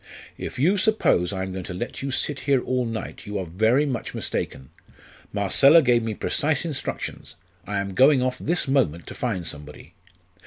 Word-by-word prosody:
"If - - -7
you 175 +10 +3
suppose 185 - +2
I 95 -1 -3
am 95 - -5
going 95 0 -5
to 90 - -6
let 120 +7 -5
you 140 - -3
sit 140 +1 -1
here 135 -2 +5
all 125 -1 -1
night, 110 -3 -6
you 105 0 -3
are 95 - -3
very 110 - +2
much 130 -5 -4
mistaken. 65 - -4 0.6
Marcella 135 - +5
gave 120 -2 +3
me 110 -1 -3
precise 150 +7 0
instructions. 150 -5 -5 0.3
I 105 - -2
am 100 -1 -3
going 130 +3 +5
off 130 0 -1
this 170 -1 0
moment 120 - +1
to - - -8
find 100 -9 -3
somebody." 75 -2 -7
120 Hz, 185 wpm, -24 LUFS, 95-140 Hz, 0.6 s, here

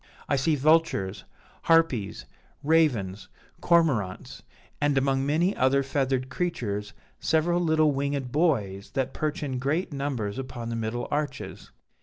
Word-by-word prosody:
I - - +2
see 145 +3 +2
vultures, 145 - +2 0.4
harpies, 165 -11 +2 0.4
ravens, 130 -12 +1 0.3
cormorants, 140 - +1 0.4
and, 145 -1 +2
among 135 0 +1
many 170 +7 +2
other 135 +2 +3
feathered 135 -1 -1
creatures, 105 - -3 0.3
several 165 +2 +2
little 155 -3 +3
winged 140 -2 -2
boys 110 - 0
that 135 -1 -1
perch 155 +2 -2
in 130 -3 -3
great 150 +6 -1
numbers 135 -7 -3
upon 125 -3 -6
the 115 - -3
middle 115 +1 -3
arches.' 150 0 -4
140 Hz, 125 wpm, -26 LUFS, 120-155 Hz, 0.4 s, other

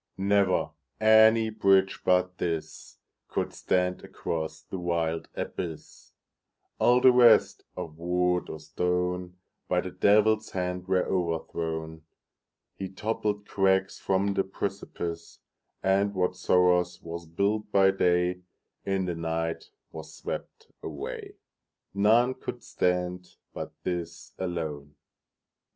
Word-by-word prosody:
Never 100 -3 +2 0.3
any 110 +1 +6
bridge 95 -3 +3
but 90 0 +2
thisCould 80 -2 -5
stand 90 0 0
across 80 -1 -4
the 95 - -6
wild 85 -2 -1
abyss; 80 -3 -6 0.7
All 125 +1 +4
the 130 - +8
rest, 120 -2 +5
of 80 -1 -7
wood 90 +1 0
or 80 - -6
stone, 90 +3 -2 0.3
By - - +1
the - - -6
Devil's 110 +1 +3
hand 90 0 -3
were 95 -1 +2
overthrown. 80 -2 -3 0.7
He 95 -1 -6
toppled 105 +1 -2
crags 95 -1 +1
from 100 +1 +1
the 95 - +1
precipice, 95 -4 -5 0.5
And 100 +1 +2
whatsoe'er 90 -1 +3 0.2
was 85 0 -7
built 105 +6 -1
by 95 -1 +5
dayIn 90 -1 +1 0.6
the 90 - -2
night 80 0 -3 0.2
was 80 0 -9
swept - - -7
away:None 105 - -2
could 125 -2 -7
stand 90 0 -1 0.2
but - - -6
this 85 -1 -5
alone. 80 -5 -4
90 Hz, 105 wpm, -27 LUFS, 85-100 Hz, 0.7 s, the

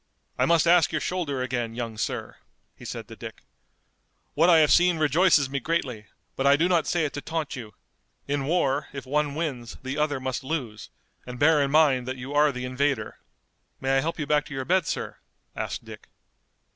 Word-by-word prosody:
"I - - +1
must 170 -1 +4
ask 170 -2 +5
your - - 0
shoulder 150 -8 -2
again, 120 -3 -3
young 115 -2 -4
sir," - - -4 0.4
he - - -13
said - - -6
to - - -10
Dick. - - -10 0.9
"What 165 +4 +4
I 170 - +7
have 155 -2 +4
seen 175 -1 +4
rejoices 155 -1 +4
me 140 +1 -3
greatly, 125 -8 -2 0.3
but 135 - 0
I 140 - +7
do 165 +4 +2
not 175 -3 +2
say 170 -3 +1
it 145 - -4
to 145 - -5
taunt 160 -1 -3
you. 115 -5 -9 0.5
In 140 -1 -1
war 145 -3 +1
if 140 -2 -7
one 145 +1 0
wins 135 -8 -4
the 130 +3 -3
other 150 -2 0
must 130 0 -3
lose, 130 -8 -4 0.4
and 125 0 -7
bear 150 +2 +4
in 140 - +1
mind 140 -4 +3
that 130 0 -4
you 130 +3 -7
are 150 0 +4
the 125 -1 -5
invader." 130 -3 -1 0.6
"May 135 0 0
I 135 - +3
help 165 +3 -3
you 150 - -3
back 150 0 +1
to 140 - -8
your 130 -1 -3
bed, 180 -1 +2
sir?" - - -4 0.4
asked - - -4
Dick. - - -12
145 Hz, 205 wpm, -26 LUFS, 130-160 Hz, 0.9 s, I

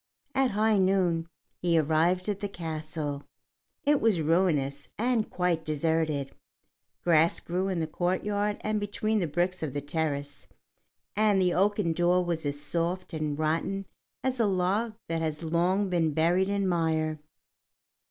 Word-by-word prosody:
At 270 -2 +3
high 215 0 +2
noon 185 -3 +2 0.3
he 170 -2 +2
arrived 165 +4 +2
at 205 -2 -1
the 205 - -3
castle. 155 -4 -4 0.6
It 295 -1 +3
was 220 -6 +3
ruinous 155 -4 +1
and 235 -1 +1
quite 180 -3 0
deserted; 155 -2 0 0.7
grass 165 -1 +4
grew 180 +3 -2
in 185 -3 -1
the - - 0
courtyard 205 +5 -1
and 215 0 0
between 215 +1 -1
the 175 - 0
bricks 175 +4 -1
of 150 -5 -3
the 145 - -1
terrace, 145 -1 -3 0.7
and 210 -1 +3
the 180 -2 +3
oaken 200 -2 +2
door 175 +2 +2
was 165 -3 -1
as 145 0 -2
soft 170 +4 -2
and 155 -2 -2
rotten 165 +5 -1 0.4
as 260 -1 -1
a 225 - +3
log 200 +4 0
that 165 0 -1
has 155 0 -3
long 175 +5 +1
been 165 -4 +1
buried 175 +4 +2
in 200 -1 0
mire. 160 -3 0
175 Hz, 150 wpm, -28 LUFS, 160-195 Hz, 0.7 s, grass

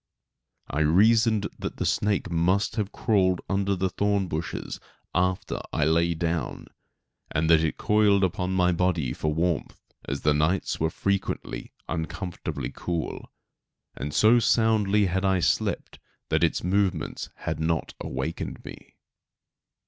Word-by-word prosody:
I 70 - -2
reasoned 110 +7 +4
that - - -5
the - - -2
snake 100 -3 0
must 90 +4 +1
have 105 -2 -2
crawled 95 -6 +2
under 100 0 +1
the 95 +1 0
thorn 100 -1 +1
bushes 80 0 -4 0.3
after 90 +1 0
I 75 - +1
lay 85 +2 +2
down, 85 0 -2 0.6
and 80 +1 0
that 80 -1 +6
it 80 - -1
coiled 105 -2 +3
upon 90 0 0
my 90 -1 +3
body 85 -7 0
for 75 - -1
warmth, 85 +1 -1 0.3
as 70 +1 -3
the 75 - +3
nights 75 +6 0
were 80 - +1
frequently 100 +3 -2 0.2
uncomfortably 85 +2 -4
cool; 85 -2 -4 0.7
and 70 +4 -4
so 110 +9 +5
soundly 110 -3 +3
had 95 +1 -1
I 95 -1 +3
slept - - -1 0.3
that - - +2
its - - +1
movements 95 +1 0
had - - -4
not 80 0 -1
awakened 65 +6 -4
me. - - -11
90 Hz, 135 wpm, -26 LUFS, 80-100 Hz, 0.7 s, that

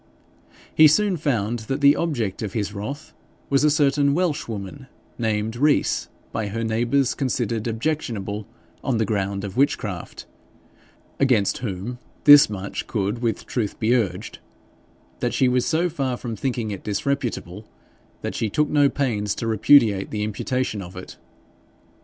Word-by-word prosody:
He 155 - +8
soon 195 +5 +3
found 120 -8 -1
that 135 +1 -1
the 140 0 +6
object 120 - -2
of 105 -3 -4
his 105 -2 -2
wrath 130 +9 -6 0.4
was 140 +1 +3
a 150 - +5
certain 140 -1 +2
Welshwoman, 135 - -3 0.3
named 110 0 -1
Rees, 145 +4 +1 0.2
by 110 -2 -2
her 115 +3 -3
neighbours 120 +4 +1
considered 120 -4 -2
objectionable 110 -5 -3 0.4
on 130 -4 0
the 110 - +1
ground 100 -1 -2
of 100 +1 -6
witchcraft, 110 - -1 0.9
against 125 -8 +2
whom 115 +1 -5 0.2
this 145 -4 +9
much 100 -1 -5
could 105 +2 -2
with 115 -3 -2
truth 110 -5 -3
be 115 +2 +2
urged, 115 -7 -1 0.8
that - - -1
she 130 - +3
was 125 0 +1
so 165 +2 +2
far 135 -7 -2
from 120 -2 -5
thinking 120 -2 -2
it 100 - -6
disreputable, 105 -3 -3 0.6
that - - -3
she 110 - -1
took 150 +7 +1
no 145 -2 +4
pains 105 -8 -1
to - - -4
repudiate 110 -2 +4
the 105 -1 -2
imputation 110 +1 -2
of 90 -1 -10
it. 90 - -9
115 Hz, 145 wpm, -23 LUFS, 105-140 Hz, 0.9 s, this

